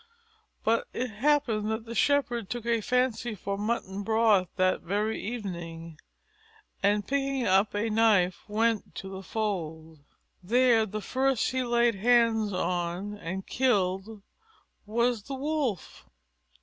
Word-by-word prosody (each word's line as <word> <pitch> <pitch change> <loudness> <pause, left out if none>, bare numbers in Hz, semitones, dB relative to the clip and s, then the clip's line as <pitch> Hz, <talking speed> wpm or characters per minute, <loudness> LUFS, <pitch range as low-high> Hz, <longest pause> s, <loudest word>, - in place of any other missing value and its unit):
But 230 +1 +1
it 250 -1 -3
happened 230 -3 +1
that 220 +1 -3
the 230 - -7
Shepherd 240 -3 +1
took 240 -2 -4
a 230 -1 +1
fancy 240 -1 0
for 200 +1 -4
mutton 205 -2 -2
broth 215 -4 +3
that 185 -1 +2
very 205 +5 -1
evening, 170 -7 -6 0.8
and, 205 0 +2
picking 275 0 -1
up 195 +2 +3
a 210 +2 0
knife, 210 -5 +3
went 225 +1 0
to 190 - -6
the 190 0 -7
fold. 165 -7 -4 0.4
There 230 +2 +3
the 215 +1 -5
first 260 +3 0
he 260 0 0
laid 240 -1 +2
hands 225 0 +3
on 180 +2 -2
and 190 +1 -5
killed 205 -4 0 0.6
was 235 +1 +1
the 270 +6 -6
Wolf. 275 - -3
220 Hz, 130 wpm, -28 LUFS, 195-240 Hz, 0.8 s, broth